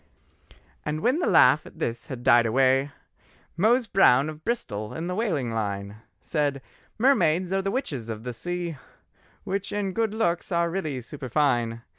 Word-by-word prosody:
And 150 Hz, +1 st, -3 dB
when 255 Hz, -, +2 dB
the 350 Hz, -, 0 dB
laugh 130 Hz, +5 st, +5 dB
at -, -, -15 dB
this 120 Hz, +4 st, -3 dB
had 130 Hz, -5 st, -7 dB
died 120 Hz, -1 st, +5 dB
away, 135 Hz, +3 st, +3 dB, 0.7 s
Mose 230 Hz, +8 st, +3 dB
Brown 155 Hz, -, +4 dB
of 155 Hz, 0 st, -10 dB
Bristol 110 Hz, -, -3 dB
in 165 Hz, -, -4 dB
the 180 Hz, -, -3 dB
whaling 170 Hz, -, -1 dB
line 100 Hz, -2 st, -3 dB, 0.2 s
Said: 145 Hz, -4 st, -1 dB, 0.4 s
"Mermaids 190 Hz, -, +2 dB
are 195 Hz, -, +1 dB
the 195 Hz, -, -2 dB
witches 145 Hz, -, -3 dB
of 110 Hz, -1 st, -5 dB
the 125 Hz, 0 st, -5 dB
sea, 175 Hz, +4 st, -4 dB, 0.7 s
Which 195 Hz, +1 st, -3 dB
in 200 Hz, -2 st, -2 dB
good 220 Hz, 0 st, -1 dB
looks 175 Hz, -5 st, -1 dB
are 170 Hz, -1 st, +1 dB
really 155 Hz, -8 st, -3 dB
superfine. 120 Hz, -3 st, -1 dB
155 Hz, 160 wpm, -25 LUFS, 125-195 Hz, 0.7 s, laugh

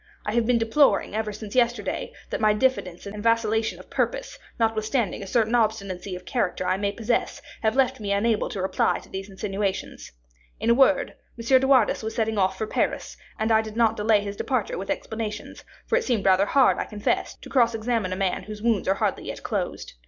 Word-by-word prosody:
I 210 Hz, -, -2 dB
have 235 Hz, -1 st, +1 dB
been 245 Hz, -1 st, +4 dB
deploring, 230 Hz, +4 st, +3 dB
ever 215 Hz, 0 st, -2 dB
since 210 Hz, 0 st, -8 dB
yesterday, 240 Hz, -5 st, 0 dB, 0.2 s
that -, -, -2 dB
my 215 Hz, -1 st, +4 dB
diffidence 210 Hz, -7 st, 0 dB
and 205 Hz, +1 st, -6 dB
vacillation 225 Hz, -1 st, +1 dB
of -, -, -15 dB
purpose, -, -, -2 dB, 0.2 s
notwithstanding 225 Hz, -1 st, 0 dB
a 195 Hz, -, -7 dB
certain 225 Hz, +2 st, +1 dB
obstinacy 200 Hz, -5 st, 0 dB
of 180 Hz, -, -10 dB
character 185 Hz, -7 st, -1 dB
I 185 Hz, -, +2 dB
may 200 Hz, 0 st, -1 dB
possess, 230 Hz, +3 st, -1 dB, 0.2 s
have 220 Hz, 0 st, +1 dB
left 265 Hz, -1 st, +2 dB
me 205 Hz, -2 st, -3 dB
unable 210 Hz, +2 st, +1 dB
to 190 Hz, -, -4 dB
reply 190 Hz, -, +1 dB
to -, -, -13 dB
these 195 Hz, +1 st, -6 dB
insinuations. 195 Hz, 0 st, -4 dB, 0.5 s
In 230 Hz, -, +2 dB
a -, -, +7 dB
word, 275 Hz, +3 st, +3 dB, 0.2 s
M. 230 Hz, -, -7 dB
de 265 Hz, -, 0 dB
Wardes 260 Hz, -5 st, +4 dB
was 220 Hz, 0 st, -5 dB
setting 220 Hz, -2 st, 0 dB
off 190 Hz, 0 st, +1 dB
for 220 Hz, -, -2 dB
Paris, -, -, -2 dB, 0.2 s
and 220 Hz, +1 st, 0 dB
I 220 Hz, 0 st, +5 dB
did 220 Hz, -1 st, -8 dB
not 225 Hz, -2 st, +3 dB
delay 210 Hz, -1 st, +3 dB
his 200 Hz, 0 st, -5 dB
departure 255 Hz, -1 st, -1 dB
with 195 Hz, -, -6 dB
explanations; 215 Hz, -2 st, -4 dB, 0.2 s
for 460 Hz, -, 0 dB
it -, -, -5 dB
seemed 235 Hz, -6 st, 0 dB
rather 190 Hz, +1 st, +4 dB
hard, 270 Hz, +2 st, +4 dB
I -, -, -1 dB
confess, 210 Hz, -2 st, -2 dB
to -, -, -13 dB
cross 235 Hz, -3 st, +3 dB
examine 225 Hz, -4 st, -1 dB
a -, -, -1 dB
man 190 Hz, -1 st, -1 dB
whose 210 Hz, 0 st, -8 dB
wounds 230 Hz, -5 st, +1 dB
are 190 Hz, -, +3 dB
hardly -, -, -1 dB
yet -, -, -6 dB
closed. -, -, -3 dB
220 Hz, 210 wpm, -25 LUFS, 200-235 Hz, 0.5 s, a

